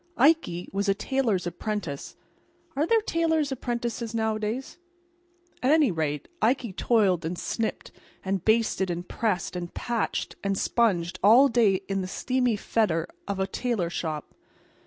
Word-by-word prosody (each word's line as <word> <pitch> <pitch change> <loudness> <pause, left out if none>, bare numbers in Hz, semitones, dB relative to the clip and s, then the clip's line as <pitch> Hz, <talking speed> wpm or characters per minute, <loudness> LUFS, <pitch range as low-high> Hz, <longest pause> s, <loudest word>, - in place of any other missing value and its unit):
Ikey 275 - +3
was 200 +1 0
a 195 - +3
tailor's 220 -5 0
apprentice. 175 -4 -4 0.6
Are 295 +4 +1
there 455 +2 +4
tailor's 320 -6 +1
apprentices 235 -2 -3
nowadays? 220 +6 -2 0.8
At 255 - +2
any 300 -6 +5
rate, 150 -3 -2
Ikey 235 -3 +1
toiled 195 -6 +2
and 170 +2 -3
snipped 225 +4 -3 0.3
and 190 -2 -1
basted 220 -4 +2
and 175 +1 -4
pressed 200 -5 -1
and 175 -1 -4
patched 235 -2 -2
and 195 -1 0
sponged 185 -8 +1
all 240 +7 +7
day 215 -5 +3
in 195 -1 -1
the 185 - -4
steamy 250 +4 0
fetor 200 -6 0 0.2
of 200 -1 -2
a 190 - +2
tailor 195 -4 -2
shop. 155 -3 -4
215 Hz, 140 wpm, -26 LUFS, 180-245 Hz, 0.8 s, all